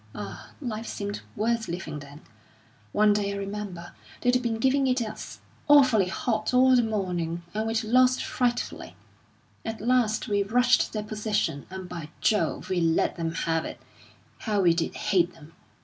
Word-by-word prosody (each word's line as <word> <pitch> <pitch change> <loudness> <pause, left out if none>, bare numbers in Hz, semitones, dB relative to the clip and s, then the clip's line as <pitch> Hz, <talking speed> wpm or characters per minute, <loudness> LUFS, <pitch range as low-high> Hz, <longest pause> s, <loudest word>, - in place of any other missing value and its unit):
Ah, - - -7
life 230 -5 -4
seemed 205 0 -4
worth 230 +1 0
living 165 -4 -5
then! 145 +1 -12 0.7
One 210 0 +4
day, 200 -1 0
I - - -4
remember, 200 -3 -5 0.3
they'd 250 0 +3
been 235 -2 -1
giving 265 +3 +2
it 255 0 +2
us 220 -2 -6 0.3
awfully 260 -9 +6
hot 215 +4 -1
all 260 0 +6
the 245 - +5
morning, 180 -6 -2
and 220 +1 -1
we'd 225 0 0
lost 255 +3 +4
frightfully. 245 -1 -2 0.7
At 225 0 -4
last 235 -1 +1
we 205 -2 +1
rushed 245 +5 +3
their 215 -1 -3
position, 210 -8 -2
and, 190 -1 -7
by 170 -4 -7
Jove, 210 - +1
we 185 -2 0
let 165 +1 +1
'em 165 -1 -1
have 165 -1 0
it! - - -7 0.6
How 210 -3 0
we 175 -3 +5
did 165 0 -2
hate 180 -4 +1
them! 160 0 -15
210 Hz, 165 wpm, -27 LUFS, 180-235 Hz, 0.7 s, awfully